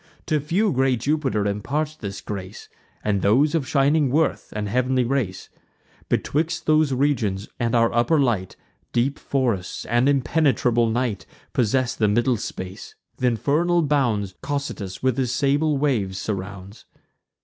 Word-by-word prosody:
To 155 - +1
few 180 +9 +1
great 130 -2 +1
Jupiter 135 -7 0
imparts 145 +10 -2
this 100 -9 -6
grace, 95 -3 -7 0.3
And 100 -2 0
those 130 +10 +3
of 155 -6 0
shining 140 0 +3
worth 155 +4 0
and 105 -1 -2
heav'nly 125 +3 +1
race. 120 -7 -2 0.6
Betwixt 165 +4 -1
those 155 -2 +3
regions 115 -8 0
and 120 0 0
our 115 0 +3
upper 120 +7 +3
light, 110 -9 0 0.4
Deep 130 +4 +1
forests 120 -9 -1
and 120 +4 +2
impenetrable 130 -4 +2
night 120 -3 -2 0.3
Possess 125 +1 +1
the 110 - +1
middle 120 +4 +2
space: 95 -2 -7 0.2
th' 130 - 0
infernal 155 +8 +2
bounds 120 -10 +1
Cocytus, 140 -10 -4
with 130 0 +1
his 125 -2 0
sable 145 +3 +1
waves, 115 -10 0
surrounds. 100 0 -6
125 Hz, 140 wpm, -23 LUFS, 105-145 Hz, 0.6 s, those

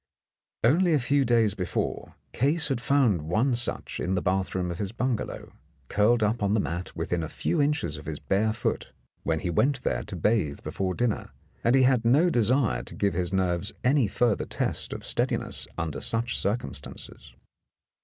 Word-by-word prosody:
Only 165 +8 +4
a - - +3
few 140 +2 +2
days 115 -4 +3
before, 90 -4 -3 0.2
Case 150 +5 +1
had 130 -3 -1
found 125 - +3
one 110 - +1
such 120 -1 -2
in 95 - -1
the 90 - 0
bathroom 95 -1 0
of 85 - -6
his 100 -2 -2
bungalow, 120 0 -3 0.4
curled 110 +2 +3
up 110 +2 0
on 100 +1 +2
the - - +2
mat 85 -1 -4
within 90 -1 -1
a 80 - -4
few 170 - -1
inches 140 - 0
of 75 - -11
his 75 -2 -4
bare 105 +3 +1
foot, 110 - -3 0.3
when 80 -1 -1
he 90 - -1
went 135 - +1
there - - 0
to 105 - -7
bathe 90 -5 0
before 95 -2 -2
dinner, 120 -3 -1 0.3
and 120 - +4
he 135 - +5
had 125 -2 +3
no 145 +10 +4
desire 120 +1 +2
to - - -10
give 100 -2 +1
his 90 0 -1
nerves 95 0 0
any 130 -1 +3
further 115 +2 +1
test - - -2
of - - -6
steadiness - - -2
under 85 -4 -3
such 115 +1 0
circumstances. 100 - -4
110 Hz, 180 wpm, -27 LUFS, 90-125 Hz, 0.4 s, he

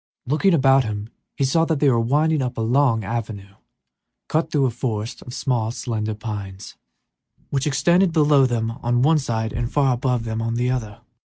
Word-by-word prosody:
Looking 160 +7 +2
about 135 -2 +4
him, 105 -1 -5 0.3
he 140 - 0
saw 150 +5 +2
they 155 -3 +1
were 120 -4 +3
winding 150 +6 +1
upward 125 -3 -3
along 120 -2 +2
an 95 - -5
avenue 105 -4 -5 0.8
cut 160 +1 0
through 145 -4 +1
a 125 - 0
forest 115 -2 -4
of 125 - -10
small, 120 -6 -1
slender 110 -3 -3
pines, 100 -3 -7 0.8
which 140 +1 0
extended 170 +7 +3
below 150 -4 +4
them 115 -2 -1
on 120 +1 +1
one 155 +2 +4
side 110 -5 -3
and 120 +1 -3
far 135 -3 +2
above 125 -1 -1
them 110 0 -3
on 115 0 -2
the 125 +1 0
other. 110 -5 -4
125 Hz, 180 wpm, -22 LUFS, 110-140 Hz, 0.8 s, about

